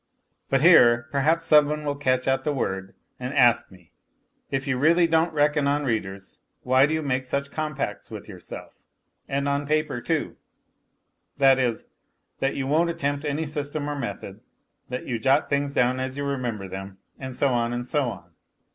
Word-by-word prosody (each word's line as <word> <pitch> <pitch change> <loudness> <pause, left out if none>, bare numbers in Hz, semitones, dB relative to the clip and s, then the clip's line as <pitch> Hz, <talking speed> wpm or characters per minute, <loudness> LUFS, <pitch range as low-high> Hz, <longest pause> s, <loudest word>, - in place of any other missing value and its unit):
But 135 -1 +2
here, 120 -8 +6
perhaps, 160 +4 +1
some 150 -2 +6
one 150 0 -3
will 145 -1 -1
catch 130 -2 0
at 135 0 +1
the 150 - 0
word 95 -8 -3 0.2
and 130 +3 -5
ask 120 -3 +4
me: 90 -2 -19 0.6
if 135 0 -2
you 140 -2 0
really 170 +4 +4
don't 165 0 +2
reckon 150 -1 +2
on 145 +1 0
readers, 100 -5 -4 0.2
why 130 +2 +4
do 155 - -2
you 160 - -2
make 130 -2 -1
such 140 +2 -3
compacts 155 -3 -4
with - - -9
yourself - - -9 0.5
and 140 +1 -1
on 140 0 -1
paper 155 -5 0
too 160 +1 -2 1.0
that 135 -2 +5
is, 120 -3 -1 0.5
that 135 - 0
you 135 - -2
won't 160 +5 +2
attempt 145 -3 -2
any 150 +2 -1
system 145 0 -3
or 145 - -3
method, 140 - -6 0.5
that 125 0 -5
you 120 -3 -3
jot 135 +6 +2
things 140 0 0
down 125 -1 +1
as 130 +1 -4
you 145 - -2
remember 125 -8 -3
them, 95 +1 -8 0.2
and 130 -1 -6
so 140 - +2
on, 120 -2 0
and 120 0 -3
so 135 0 0
on 85 -6 -10
140 Hz, 180 wpm, -25 LUFS, 125-150 Hz, 1.0 s, here